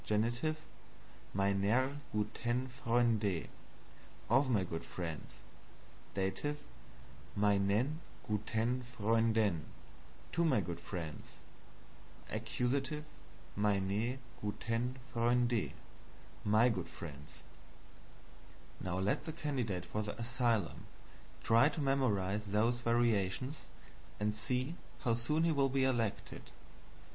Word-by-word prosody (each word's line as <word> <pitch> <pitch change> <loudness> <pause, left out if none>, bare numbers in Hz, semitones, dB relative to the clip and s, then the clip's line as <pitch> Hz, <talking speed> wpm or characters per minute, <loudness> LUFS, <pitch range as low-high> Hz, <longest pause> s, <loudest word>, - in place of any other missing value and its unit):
MeinER 100 +8 +2
gutEN 120 +4 -1
FreundE, 115 -7 +1 0.8
of 135 +2 +5
my 105 -6 +3
good 80 -2 -4
friends. 80 -4 -5 0.9
D. 95 -1 +1 1.1
MeinEN 105 +8 +3 0.3
gutEN 110 +4 0
FreundEN, 110 -6 +2 0.7
to 170 - +2
my 145 -9 +4
good 85 -3 -3
friends. 80 -5 -6 1.0
A. - - 0 1.2
MeinE 105 +4 +1 0.2
gutEN 115 +4 -1 0.2
FreundE, 120 0 +2 0.7
my 110 +3 +5
good 100 -8 -1
friends. 75 -3 -9 1.4
Now 95 -1 -2
let 95 +2 +1
the 160 - -3
candidate 130 - -2
for 105 - -2
the 105 +2 -4
asylum 115 -5 0 0.6
try 115 +6 +6
to 155 - -5
memorize 105 -8 +1
those 110 +4 +2
variations, 120 +2 +1 0.5
and 105 0 +1
see 125 +9 -1 0.2
how 120 - +2
soon 135 +8 +1
he 165 - +4
will 140 -3 +3
be 135 0 +2
elected. 120 -5 -1
115 Hz, 95 wpm, -35 LUFS, 100-125 Hz, 1.4 s, try